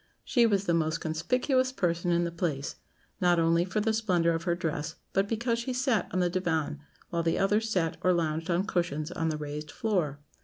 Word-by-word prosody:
She 240 -3 +3
was 200 -2 +1
the 170 - +2
most 160 0 +1
conspicuous 250 - +1
person 175 -7 0
in 170 0 +3
the 170 - -2
place, 160 -5 -2 0.4
not 175 -1 +4
only 165 +1 +3
for 190 +4 -1
the 220 +1 +1
splendour 180 -7 +2
of 165 +1 -3
her 175 -2 +2
dress, 160 -2 -3 0.2
but 195 +1 +2
because 230 +1 0
she 250 +2 -3
sat 250 -3 +1
on 185 - +1
the 180 - +3
diwán, 160 -5 -1 0.3
while 170 -1 0
the 165 0 +1
others 210 +3 +2
sat 165 -6 0
or 185 - +3
lounged 165 -1 0
on 175 +2 +2
cushions 170 -5 -1
on 165 -2 -1
the 155 - -1
raised 150 0 -5
floor. 180 - -1
175 Hz, 205 wpm, -29 LUFS, 165-205 Hz, 0.4 s, not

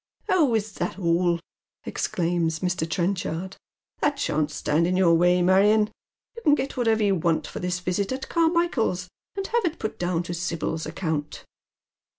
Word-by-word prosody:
" - - -49
Oh, 300 -10 +4
is 215 -1 -1
that 175 -1 -4
all? 170 -1 +2 0.2
" - - -69
exclaims 165 -2 -1
Mr. 180 -3 -1
Trenchard. 180 +1 -2 0.2
" - - -45
That 290 -1 +1
shan't 155 - 0
stand 155 +2 +1
in 185 +1 +1
your 180 -3 +5
way, 175 +1 +4
Marion. 210 +4 +4 0.4
You 465 - -8
can 295 -7 +5
get 275 - -3
whatever 225 -4 +2
you 200 -1 +3
want 165 -2 0
lor - - -4
this 180 0 -1
visit 180 +3 -1
at 265 +1 -4
Carmichael's, 325 - +1 0.3
and 390 - -2
have 470 +3 0
it 335 -2 -1
put 220 - -5
down 175 -1 0
to 175 - -5
Sibyl's 165 -2 -3
account." 160 -2 -3
180 Hz, 175 wpm, -25 LUFS, 170-220 Hz, 0.4 s, your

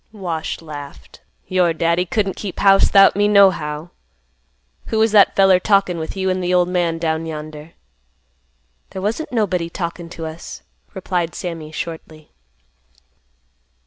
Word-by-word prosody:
Wash 175 -8 -5
laughed; 140 - -11 0.2
"Your 180 -2 +1
daddy 170 +3 0
couldn't 195 0 -1
keep 195 -4 -7
house 195 -1 +5
'thout 195 -1 +6
me, 205 +1 +2
nohow. 175 -6 +2 1.0
Who 220 - -2
was 220 0 +3
that 205 -2 +5
feller 195 -2 +5
talkin' 195 -3 +1
with 160 +4 -6
you 190 0 -1
an' 185 0 -2
th' 180 0 -1
old 180 -1 +2
man 175 -2 0
down 165 0 -2
yonder?" 155 0 -8 1.2
"There 190 - -7
wasn't 230 +10 -3
nobody 185 -8 -1
talkin' 170 -1 -5
to 165 -1 -7
us," 160 +1 -9 0.3
replied 175 -2 -2
Sammy 165 -3 -6
shortly. 160 -1 -8
175 Hz, 140 wpm, -19 LUFS, 160-195 Hz, 1.2 s, thout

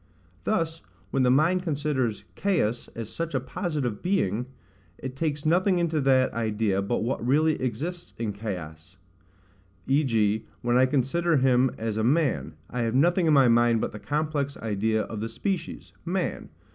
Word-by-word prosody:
Thus, 165 -6 0 0.3
when 135 - +1
the 125 - +4
mind 160 +8 +3
considers 145 - -1
Caius 160 - 0
as 115 -2 -6
such 165 -3 -3
a - - +3
positive 140 - -3
being, 125 - 0 0.5
it 130 0 -6
takes 150 0 -2
nothing 180 +4 +3
into 165 -3 +1
that 130 -1 +3
idea 110 -3 0
but 105 +3 -1
what 120 0 -2
really 150 +5 +2
exists 155 +9 -4
in 115 -3 -2
Caius; 90 -4 -7 0.9
v.g. 115 -7 +1 0.2
when 120 0 +2
I 130 +1 +5
consider 150 +5 +1
him 130 0 +4
as 110 -1 -3
a 110 - 0
man, 145 +4 +1
I 125 - -3
have 115 0 0
nothing 170 +5 +3
in 155 - +5
my 135 -3 +6
mind 120 -1 +4
but - - -2
the 105 - -8
complex 145 +4 -2
idea 110 0 0
of 110 - -6
the 110 +2 -3
species, 170 - -4
man. 180 +2 -2
130 Hz, 160 wpm, -26 LUFS, 115-160 Hz, 0.9 s, my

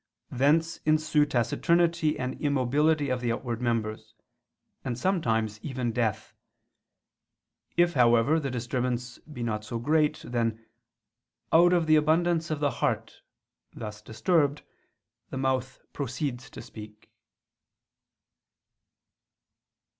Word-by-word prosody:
Thence 155 +6 +2
ensue 155 -1 +2
taciturnity 165 +6 +1
and 130 0 -4
immobility 145 +2 +1
of 125 -1 -1
the 120 -1 0
outward 120 0 -3
members; 115 -3 -2 0.7
and 120 -3 -3
sometimes 115 - 0
even 130 -4 -3
death. 115 -3 -2 1.4
If, 175 0 +4
however, 120 +4 +4
the 140 -3 -3
disturbance 125 0 -3
be 145 -6 -8
not 110 -2 -2
so 110 +2 -5
great, 150 +5 +1
then 115 -2 -2 0.9
"out 175 +2 +6
of 175 -2 +3
the 155 0 +5
abundance 165 +2 +2
of 155 -2 -2
the 145 -1 +1
heart" 120 - -2 0.5
thus 105 -1 -7
disturbed, 145 - 0 0.7
the - - -5
mouth 130 0 -1
proceeds 130 -1 -4
to - - -10
speak. 105 -1 -12
130 Hz, 110 wpm, -27 LUFS, 120-155 Hz, 1.4 s, out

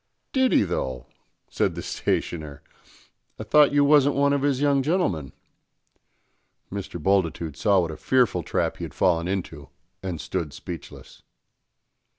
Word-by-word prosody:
"Did 260 -1 +3
he - - +4
though?" 65 -9 -3 0.4
said - - -1
the - - -6
stationer. 75 -4 -3 0.7
"I - - -6
thought 145 +7 +5
you 145 0 +4
wasn't 145 -1 +5
one 140 +1 +3
of 140 - +1
his 140 -2 +1
young 140 -1 +3
gentlemen?" 130 - -1 1.4
Mr. 95 -3 -5
Bultitude 85 -4 0
saw 100 0 +3
what 85 -2 -3
a 80 - -8
fearful 125 +2 +2
trap - - -1
he - - -7
had - - -7
fallen 85 -2 +2
into 85 -6 -4 0.3
and 90 -4 -4
stood 75 -4 -4
speechless. 85 +2 -10
95 Hz, 145 wpm, -24 LUFS, -, 1.4 s, thought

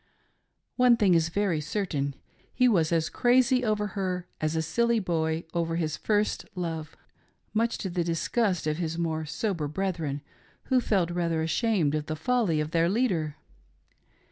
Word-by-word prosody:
One 250 -2 +6
thing 200 -5 +4
is 165 -1 +3
very 180 -4 0
certain 150 -5 -2 0.2
— - - -35
he 250 0 +4
was 175 -9 +3
as 165 -1 +2
crazy 255 +1 +3
over 210 -2 0
her 185 -2 -3 0.2
as 155 +1 0
a 160 - 0
silly 235 +7 +1
boy 165 -3 -1
over 165 -1 -1
his 160 -3 -1
first 210 -1 0
love, 165 -3 -4 0.6
much 230 +2 +1
to 190 - -4
the 175 0 0
disgust 180 +3 0
of 155 0 0
his 165 -1 -2
more 160 -2 -1
sober 170 -2 -2
brethren 160 -4 -3 0.4
who 260 -2 +2
felt 185 -7 +1
rather 170 -2 0
ashamed 165 -3 +1
of 150 -1 -2
the 155 - -2
folly 190 -1 +1
of 150 +1 -2
their 165 0 +2
leader. 180 - 0
170 Hz, 165 wpm, -27 LUFS, 160-210 Hz, 0.6 s, One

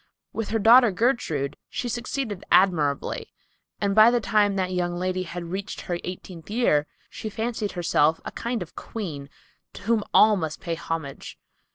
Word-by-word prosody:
With 225 -2 -3
her 225 - +1
daughter 235 +3 +7
Gertrude, 185 - 0
she 250 - -3
succeeded 235 -3 -3
admirably, 155 -7 +2 0.5
and 200 -1 +1
by 215 +2 +8
the 240 0 +2
time 205 -2 +2
that 185 -1 -1
young 175 -1 -1
lady 185 +1 -1
had 170 -1 -6
reached 195 +2 -4
her 175 -1 -3
eighteenth 180 -2 -8
year, 205 -10 +2 0.2
she 215 - -6
fancied 220 -1 -3
herself 165 -3 +2
a - - -5
kind 235 -3 -3
of 175 - -17
queen 155 -11 -6 0.4
to - - -11
whom 225 0 +1
all 215 0 +6
must 160 -3 -4
pay 170 - -3
homage. 165 -4 -5
190 Hz, 165 wpm, -25 LUFS, 170-220 Hz, 0.5 s, by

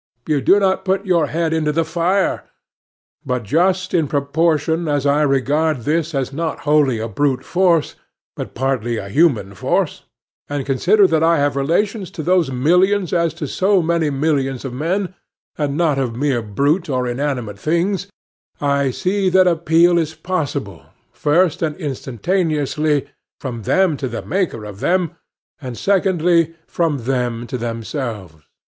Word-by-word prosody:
You 150 -3 +1
do 200 - +5
not 190 -1 +1
put 195 +1 0
your 170 -5 +2
head 160 +2 -1
into 155 -2 +1
the 165 +2 0
fire. 175 +4 0 0.7
But 125 -2 -2
just 180 - +1
in 165 -4 +2
proportion 160 +3 0
as 145 -2 0
I 145 +1 +3
regard 145 +1 +1
this 160 +4 -1
as 135 0 -2
not 160 +2 -3
wholly 145 -5 +2
a 110 +1 -3
brute 130 +4 -1
force, 175 -4 +2 0.4
but - - -7
partly 120 -3 -1
a 100 -2 -6
human 120 - +2
force, 95 - -1 0.4
and 145 -2 -3
consider 185 +10 +3
that 160 -4 +2
I 165 +1 +4
have 145 -1 +1
relations 185 - 0
to 155 - -3
those 180 -3 +2
millions 180 +8 +2
as 170 -2 +2
to 155 -3 -4
so 190 +4 +2
many 165 -1 +1
millions 135 -2 -1
of 130 - -5
men, 180 +8 -2 0.4
and 145 -1 -2
not 160 -5 +2
of 125 -4 -2
mere 130 -2 0
brute 140 - 0
or 125 -2 0
inanimate 120 -5 -3
things, 175 - 0 0.5
I 140 -1 +1
see 190 +8 0
that 185 0 +5
appeal 170 0 +3
is 160 -1 -2
possible, 180 -6 -3 0.3
first 165 +2 +1
and 155 -2 -1
instantaneously, 150 - -1 0.3
from 120 -4 -5
them 180 - +2
to 135 - -3
the 115 -1 -5
Maker 180 - -2
of 100 -1 -9
them, 180 +2 +1 0.5
and, 125 -4 -6
secondly, 175 -4 +2
from 155 -7 -1
them 120 -2 -1
to 125 +1 -5
themselves. 115 - -5
150 Hz, 155 wpm, -19 LUFS, 135-175 Hz, 0.7 s, do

